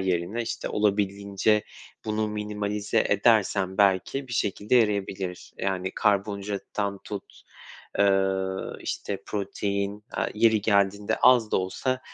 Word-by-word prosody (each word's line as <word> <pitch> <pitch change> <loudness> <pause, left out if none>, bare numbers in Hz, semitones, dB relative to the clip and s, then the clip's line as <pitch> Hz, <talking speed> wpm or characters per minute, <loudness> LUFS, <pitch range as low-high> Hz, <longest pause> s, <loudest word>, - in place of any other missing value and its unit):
yerine, 95 +4 -1
işte, 115 - -4
olabildiğince 100 0 +1 0.4
bunu 110 0 -1
minimalize 105 -1 -1
edersem 100 -3 +2
belki 100 +7 +2
bir - - -7
şekilde 105 +1 0
yarayabilir. 100 -5 0
Yani, 95 -1 -1
karbonhidrattan 100 0 -1
tut, 100 -2 -8 0.6
eee, 95 -1 +4 0.5
işte, 100 -1 -4
protein, 100 0 -2
aaa, - - -1
yeri 110 0 +4
geldiğinde 100 -1 +2
az 120 -4 +6
da - - +2
olsa 130 +8 -1
100 Hz, 110 wpm, -26 LUFS, 95-105 Hz, 0.6 s, az